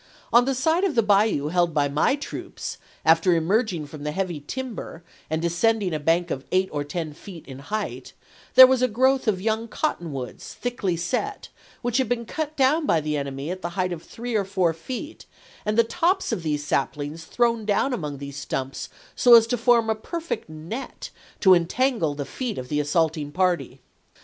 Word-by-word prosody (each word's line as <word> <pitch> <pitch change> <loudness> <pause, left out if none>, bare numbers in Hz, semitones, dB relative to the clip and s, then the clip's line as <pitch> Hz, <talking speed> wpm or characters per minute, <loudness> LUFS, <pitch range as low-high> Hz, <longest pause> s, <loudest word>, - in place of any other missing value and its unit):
On 240 +1 +7
the 270 0 0
side 320 +8 +2
of 380 -6 +1
the 230 - +4
bayou 200 -8 +3
held 175 -1 +1
by 145 -1 +3
my 150 - +2
troops 290 - -7 0.3
(after 165 +2 +5
emerging 175 0 +1
from 145 0 -10
the 150 - -2
heavy 175 -2 -2
timber 220 - -6 0.3
and 160 +1 -1
descending 190 +2 +1
a 155 - -1
bank 165 +3 +1
of 135 - -3
eight 185 +1 +2
or 145 -1 -2
ten 155 +1 -4
feet 170 +1 -11
in 135 -1 -9
height) 210 +9 -5 0.4
there 260 - +12
was 260 -1 +2
a 255 - +4
growth 260 +3 +2
of 200 -4 +2
young 220 +3 -1
cotton 195 - -2
woods, 130 -3 -7
thickly 205 -8 -2
set, 285 - -3 0.3
which 245 0 0
had 260 -4 +1
been 240 -1 -1
cut 310 +5 -4
down 290 +3 +3
by 165 - +3
the 150 0 -2
enemy 140 +2 -4
at 185 0 -5
the 175 - -3
height 180 -1 0
of 165 - -7
three 240 +6 -7
or 210 -2 +2
four 190 -3 +1
feet 255 - -7 0.4
and 210 +1 0
the 230 - +7
tops 355 - 0
of - - -1
these 150 -2 -2
saplings 150 +3 -2
thrown 235 +3 +1
down 210 +6 +1
among 150 - -4
these 140 0 -8
stumps 135 -1 -4 0.3
so 245 -1 +7
as 230 -1 +7
to 230 - 0
form 235 -1 +3
a 220 - +3
perfect 330 - -5
net 165 +12 -7 0.3
to 190 -2 +7
entangle 175 - +1
the 145 -1 -4
feet 240 - -4
of 125 0 -6
the 150 - 0
assaulting 150 0 0
party. 175 -6 0
185 Hz, 195 wpm, -24 LUFS, 155-240 Hz, 0.4 s, there